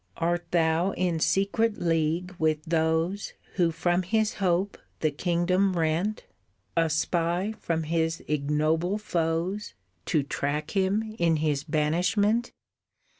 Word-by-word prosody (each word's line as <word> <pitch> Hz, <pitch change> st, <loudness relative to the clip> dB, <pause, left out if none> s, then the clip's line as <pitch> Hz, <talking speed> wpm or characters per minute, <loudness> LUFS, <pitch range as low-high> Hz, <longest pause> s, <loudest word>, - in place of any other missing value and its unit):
"Art 170 Hz, +1 st, -1 dB
thou 165 Hz, +2 st, +2 dB
in 175 Hz, -3 st, 0 dB
secret 205 Hz, +6 st, +1 dB
league 165 Hz, +2 st, 0 dB
with 155 Hz, -1 st, +1 dB
those 165 Hz, +4 st, 0 dB, 0.2 s
Who 175 Hz, -3 st, +4 dB
from 175 Hz, +2 st, +1 dB
his 215 Hz, +4 st, +1 dB
hope 185 Hz, +2 st, +1 dB, 0.2 s
the 155 Hz, -, +2 dB
kingdom 180 Hz, +4 st, +1 dB
rent? 170 Hz, +6 st, 0 dB, 0.5 s
A 165 Hz, -1 st, +3 dB
spy 170 Hz, +5 st, 0 dB
from 165 Hz, -1 st, -1 dB
his 160 Hz, +1 st, -1 dB
ignoble 155 Hz, +5 st, +1 dB
foes 175 Hz, -, -2 dB, 0.3 s
To 155 Hz, -3 st, +2 dB
track 145 Hz, +2 st, -2 dB
him 210 Hz, +3 st, 0 dB
in 165 Hz, -1 st, +3 dB
his 150 Hz, -2 st, 0 dB
banishment? 180 Hz, +9 st, +1 dB
170 Hz, 120 wpm, -27 LUFS, 160-190 Hz, 0.5 s, Who